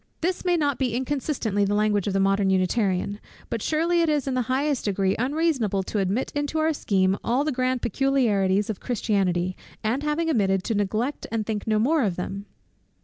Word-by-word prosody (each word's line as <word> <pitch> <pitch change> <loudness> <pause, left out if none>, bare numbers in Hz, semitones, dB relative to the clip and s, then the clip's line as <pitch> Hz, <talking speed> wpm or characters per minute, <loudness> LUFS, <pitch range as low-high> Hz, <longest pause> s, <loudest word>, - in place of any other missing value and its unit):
This 355 +2 -1
may 355 -1 +2
be - - +1
not 285 -4 0
inconsistently 250 -4 -1
the 200 +1 +1
language 210 -2 +1
of 200 - 0
the 195 - +1
modern 195 0 +2
Unitarian; 190 +1 0 0.3
but 230 - -2
surely 335 +5 +1
it 330 - +2
is 295 -3 0
in 265 - 0
the 255 - +1
highest 275 +1 0
degree 195 -1 +1
unreasonable 255 - 0
to 205 - -2
admit 200 +7 -1
into 290 +1 -2
our 315 +1 +2
scheme 190 -7 +1
all 250 +4 +1
the 305 - 0
grand 255 -1 -1
peculiarities 210 -6 +1
of 205 - -7
Christianity, 190 -6 0 0.3
and 230 +6 0
having 300 +2 -1
admitted, 195 - +1
to 225 - -1
neglect 215 +7 -1
and 225 -2 -1
think 215 -1 -3
no 215 -1 +2
more 285 +8 +2
of 195 -7 0
them! 195 +3 -5
225 Hz, 195 wpm, -25 LUFS, 195-285 Hz, 0.3 s, may